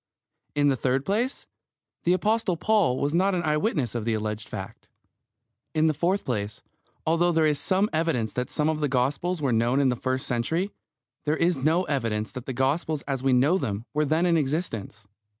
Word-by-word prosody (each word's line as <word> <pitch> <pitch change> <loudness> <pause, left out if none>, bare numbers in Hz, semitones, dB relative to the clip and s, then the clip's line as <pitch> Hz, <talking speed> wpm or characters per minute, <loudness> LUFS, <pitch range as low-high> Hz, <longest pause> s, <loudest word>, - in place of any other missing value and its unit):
In 145 0 +3
the 135 - +2
third 130 +2 0
place, 230 - -1 0.6
the 175 - +4
Apostle 210 -1 +1
Paul 205 -11 +2
was 145 +2 -1
not 190 +3 +3
an 175 - -1
eye 150 -2 +2
witness 150 - 0
of 120 -2 -2
the 115 0 0
alleged 105 0 -4
fact. - - -8 0.9
In 155 0 +3
the 155 - +3
fourth 175 +7 0
place, 105 -4 -3 0.4
although 170 +2 +3
there 160 -1 +3
is 150 -2 +2
some 190 +2 +2
evidence 155 -9 0
that 125 0 -2
some 155 +1 +1
Gospels 145 +4 0
were 130 -4 +2
known 120 +4 +2
in 135 -2 +3
the 125 - +1
first 130 +2 -2
century, 160 - -1 0.5
there 150 +1 +1
is 170 -1 +2
no 160 +7 +2
evidence 115 - -1
that 125 -1 -8
the - - -2
Gospels 145 +4 0
as 135 -2 -3
we 135 0 +2
know 140 +9 +4
them 110 -5 -3
were 150 - +2
then 160 +4 +2
in 170 -2 +3
existence. 135 - -3
145 Hz, 190 wpm, -26 LUFS, 125-170 Hz, 0.9 s, the